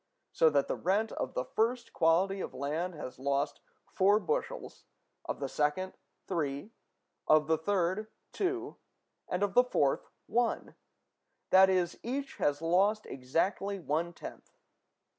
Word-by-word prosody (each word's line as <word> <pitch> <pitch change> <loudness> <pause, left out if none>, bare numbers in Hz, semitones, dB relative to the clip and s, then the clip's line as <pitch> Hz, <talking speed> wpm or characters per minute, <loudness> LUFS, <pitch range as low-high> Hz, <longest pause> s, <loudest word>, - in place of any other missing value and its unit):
So 160 - +5
that 145 -2 +2
the - - 0
rent 205 +5 +1
of - - -4
the 125 - -1
first 230 - -1
quality 185 +4 +3
of - - -6
land 160 +6 -2
has 130 -5 -7
lost 140 +2 0 0.3
four 200 +3 +3
bushels; 485 - -3 0.4
of - - -4
the - - -2
second, 150 +6 -1 0.3
three; 150 +2 -2 0.6
of 155 0 +5
the 160 +1 +3
third, 190 +3 0 0.2
two; 375 0 -2 0.5
and 180 +2 0
of 200 -1 0
the 245 - +7
fourth, 145 - +1 0.2
one: 235 +1 0 0.8
that 190 0 +8
is, 180 -2 +1
each 275 +3 -4
has 145 +2 0
lost 195 +6 +3
exactly 170 +10 -1
one 165 +1 -1
tenth. - - -11
185 Hz, 140 wpm, -31 LUFS, 150-210 Hz, 0.8 s, that